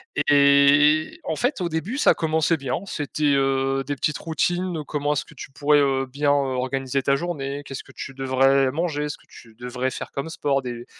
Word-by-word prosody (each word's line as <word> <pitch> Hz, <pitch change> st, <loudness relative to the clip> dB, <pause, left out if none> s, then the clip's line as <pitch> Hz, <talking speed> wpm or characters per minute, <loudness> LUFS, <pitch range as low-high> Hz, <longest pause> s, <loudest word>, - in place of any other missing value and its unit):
Et 145 Hz, -, 0 dB
et 145 Hz, +2 st, +5 dB
en 160 Hz, -, -2 dB
fait 245 Hz, -, -1 dB
au 175 Hz, -, -1 dB
début 170 Hz, +10 st, -3 dB
ça -, -, +5 dB
commençait 160 Hz, 0 st, +1 dB
bien, 130 Hz, -3 st, -3 dB
c'était, 145 Hz, -4 st, -1 dB
heu, 135 Hz, 0 st, +1 dB
des 145 Hz, +2 st, -3 dB
petites 145 Hz, +2 st, -1 dB
routines. 175 Hz, 0 st, -1 dB
Comment 145 Hz, 0 st, -1 dB
est-ce 145 Hz, -, -2 dB
que -, -, -16 dB
tu 135 Hz, -, -9 dB
pourrais, 145 Hz, +2 st, +3 dB
heu, 135 Hz, -1 st, +1 dB
bien, 145 Hz, +2 st, 0 dB
heu, -, -, +4 dB, 0.2 s
organiser 135 Hz, +1 st, -2 dB
ta 140 Hz, -, +3 dB
journée? 145 Hz, -4 st, -4 dB
Qu'est-ce 135 Hz, 0 st, -7 dB
que -, -, -17 dB
tu 135 Hz, -, -7 dB
devrais 135 Hz, 0 st, +2 dB
manger? 150 Hz, -1 st, -2 dB
Ce 145 Hz, -, -6 dB
que -, -, -25 dB
tu 115 Hz, -, -16 dB
devrais 125 Hz, +2 st, -3 dB
faire -, -, -7 dB
comme 140 Hz, +4 st, -4 dB
sport, 140 Hz, -4 st, -1 dB
des 120 Hz, -2 st, -7 dB
140 Hz, 205 wpm, -23 LUFS, 135-155 Hz, 0.2 s, et